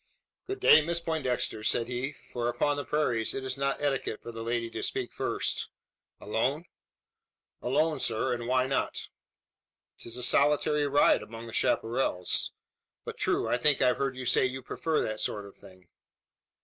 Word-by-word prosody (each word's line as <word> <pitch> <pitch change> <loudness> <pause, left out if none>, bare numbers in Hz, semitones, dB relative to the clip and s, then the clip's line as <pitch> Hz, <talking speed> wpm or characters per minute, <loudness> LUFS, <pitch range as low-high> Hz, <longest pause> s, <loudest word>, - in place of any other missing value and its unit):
"Good 395 +1 -4
day, 155 - +8
Miss 170 +2 0
Poindexter?" 135 -9 -1
said 115 +1 +1
he 125 +3 -2 0.2
for 120 -1 -1
upon 130 +5 +1
the 145 - -3
prairies 120 -8 0
it 135 - -3
is 130 -1 -3
not 140 0 -1
etiquette 135 -6 -1
for 120 - -7
the 115 0 -7
lady 115 0 -1
to - - -4
speak - - -2
first. - - -2 0.5
"Alone?" 130 +10 -1 1.0
"Alone, 155 +4 +1
sir. 120 +2 0
And 120 -1 -4
why 130 0 +3
not?" 135 +1 -2 0.9
"'Tis 115 +1 -4
a 125 - -2
solitary 145 +2 +3
ride 145 +1 +4
among 115 +1 -9
the 115 - -9
chapparals. 115 -6 +1 0.5
But - - -7
true: - - +1
I - - +2
think 145 +2 +4
I've 125 -1 +3
heard 135 -1 -1
you 130 - -5
say 130 - +3
you 130 0 -6
prefer 160 +4 -1
that 110 0 -3
sort 105 -1 -2
of 100 - -13
thing?" 95 -2 -17
130 Hz, 170 wpm, -29 LUFS, 115-145 Hz, 1.0 s, day